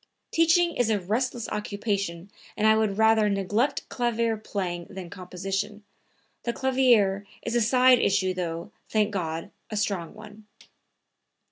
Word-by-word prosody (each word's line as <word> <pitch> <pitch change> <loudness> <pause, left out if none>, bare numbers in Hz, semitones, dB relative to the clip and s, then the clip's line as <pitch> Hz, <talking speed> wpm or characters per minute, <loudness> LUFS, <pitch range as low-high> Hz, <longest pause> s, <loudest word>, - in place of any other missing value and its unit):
Teaching 335 +1 +3
is 245 -2 +1
a 215 -2 +2
restless 235 +5 -2
occupation 200 -4 -3 0.3
and 215 - +1
I 220 0 +6
would 215 -2 0
rather 220 -1 +4
neglect 205 +8 0
clavier 235 -2 0
playing 185 -5 -4
than 185 -3 -8
composition; 195 +3 -4 0.6
the 235 - -2
clavier 235 -8 +3 0.2
is 230 - -3
a 240 - +3
side 250 +2 +5
issue, 190 -3 +2
though, 170 -2 -4 0.2
thank 215 -1 +1
God, 165 -1 -3 0.2
a 215 - -4
strong 200 -5 -2
one." 215 0 -13
210 Hz, 135 wpm, -26 LUFS, 195-230 Hz, 0.6 s, I